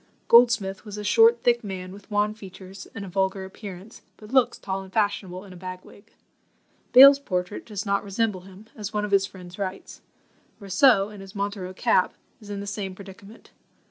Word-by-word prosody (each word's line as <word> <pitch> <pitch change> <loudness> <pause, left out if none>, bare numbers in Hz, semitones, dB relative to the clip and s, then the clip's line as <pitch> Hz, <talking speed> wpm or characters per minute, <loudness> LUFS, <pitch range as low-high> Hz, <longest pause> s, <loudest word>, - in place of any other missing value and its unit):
Goldsmith 230 -5 +4
was 210 -2 -8
a 210 - -5
short 230 +2 +4
thick 240 -1 +2
man, 185 -2 -6
with 200 +2 -14
wan 210 0 +1
features 190 -2 -11
and 200 -2 -6
a - - -9
vulgar 190 +1 -1
appearance, 195 +1 -10 0.2
but 215 +3 -13
looks 260 -3 +3
tall 195 -1 -4
and 190 -1 -12
fashionable 200 -3 -1
in 190 - -12
a - - -12
bag 185 0 -8
wig. 200 - -18 0.8
Bayle's 275 +2 +9
portrait 180 -6 -4
does 210 -2 -5
not 200 0 0
resemble 200 -1 -1
him, 190 +3 -15
as 210 -1 -6
one 210 -1 -1
of 205 - -7
his 195 -1 +3
friends 180 0 -13
writes. 195 -1 -6 0.6
Rousseau, 200 +1 +3
in 210 -2 -11
his 195 +2 -12
Montero 200 -2 -4
cap, 185 - +2 0.2
is 210 -3 -14
in 200 -1 -5
the - - -6
same 200 -2 -5
predicament. 200 +2 -14
200 Hz, 190 wpm, -25 LUFS, 190-210 Hz, 0.8 s, Bayle's